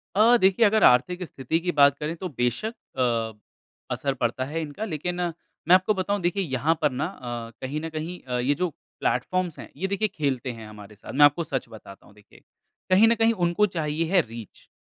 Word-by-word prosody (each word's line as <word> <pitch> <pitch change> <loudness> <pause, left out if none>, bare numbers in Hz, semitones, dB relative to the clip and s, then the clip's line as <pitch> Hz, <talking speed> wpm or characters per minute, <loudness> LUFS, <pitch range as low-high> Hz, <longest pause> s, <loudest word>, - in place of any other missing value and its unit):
अ, 230 +4 +6
देखिए 195 +3 +4
अगर 220 +1 +3
आर्थिक 175 +9 +4
स्थिति 160 -1 -2
की 175 +1 -1
बात 140 -3 +5
करें 155 +3 -3
तो 180 +2 -5
बेशक 125 - -2 0.2
अ, 115 -4 -1 0.5
असर 140 -1 -1
पड़ता 125 0 -1
है 160 +4 -3
इनका 155 +7 -5
लेकिन 175 -1 -3 0.5
मैं 175 - +6
आपको 185 +3 +3
बताऊँ 200 +2 -1
देखिए 180 +3 0
यहाँ 145 +2 0
पर 150 - +3
ना 130 +5 -2
अ, 120 -9 -7
कहीं 145 +4 -3
न 165 - -4
कहीं 160 +3 -5
अ, 125 -1 -2
ये 130 +4 +2
जो 180 0 -1 0.3
प्लेटफॉर्म्स 185 -3 -1
हैं, - - -9
ये 190 +5 -1
देखिए 200 +2 0
खेलते 135 - -2
हैं 115 -2 -10
हमारे 105 0 -12
साथ। 105 - -10
मैं 145 +2 +7
आपको 145 +4 +3
सच 135 -4 -3
बताता 105 -3 -13
हूँ - - -19
देखिए। 105 -1 -20 0.5
कहीं 190 +4 +6
न 230 - +4
कहीं 225 0 +3
उनको 175 +5 +3
चाहिए 155 0 -1
है 190 -2 +5
रीच 115 -2 -11
155 Hz, 205 wpm, -25 LUFS, 125-185 Hz, 0.5 s, मैं